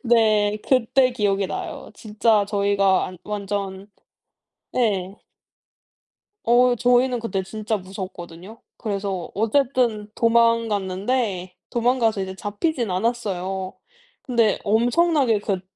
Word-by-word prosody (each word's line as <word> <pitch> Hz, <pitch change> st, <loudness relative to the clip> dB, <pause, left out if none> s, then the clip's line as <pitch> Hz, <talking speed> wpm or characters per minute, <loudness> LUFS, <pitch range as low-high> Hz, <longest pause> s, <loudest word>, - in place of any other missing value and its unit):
네 215 Hz, -4 st, +3 dB
그때 255 Hz, 0 st, +3 dB
기억이 200 Hz, -4 st, 0 dB
나요. -, -, -6 dB
진짜 215 Hz, -1 st, +1 dB
저희가 200 Hz, -2 st, +2 dB
안 185 Hz, -1 st, -10 dB
완전 200 Hz, -1 st, -4 dB, 0.9 s
예. 200 Hz, -5 st, 0 dB, 1.3 s
어 245 Hz, +1 st, +4 dB
저희는 245 Hz, +1 st, +2 dB
그때 205 Hz, -4 st, -2 dB
진짜 215 Hz, +3 st, -3 dB
무서웠거든요. 185 Hz, +1 st, -9 dB, 0.2 s
그래서 195 Hz, -4 st, -3 dB
어쨌든 225 Hz, -1 st, +1 dB
도망갔는데 220 Hz, -4 st, +1 dB
도망가서 235 Hz, -3 st, +1 dB
이제 190 Hz, 0 st, -5 dB
잡히진 215 Hz, -, -2 dB
않았어요. 190 Hz, -3 st, -2 dB, 0.5 s
근데 230 Hz, -5 st, +2 dB
엄청나게 245 Hz, +3 st, +2 dB
그 200 Hz, -3 st, -2 dB
210 Hz, 235 characters per minute, -23 LUFS, 195-235 Hz, 1.3 s, 어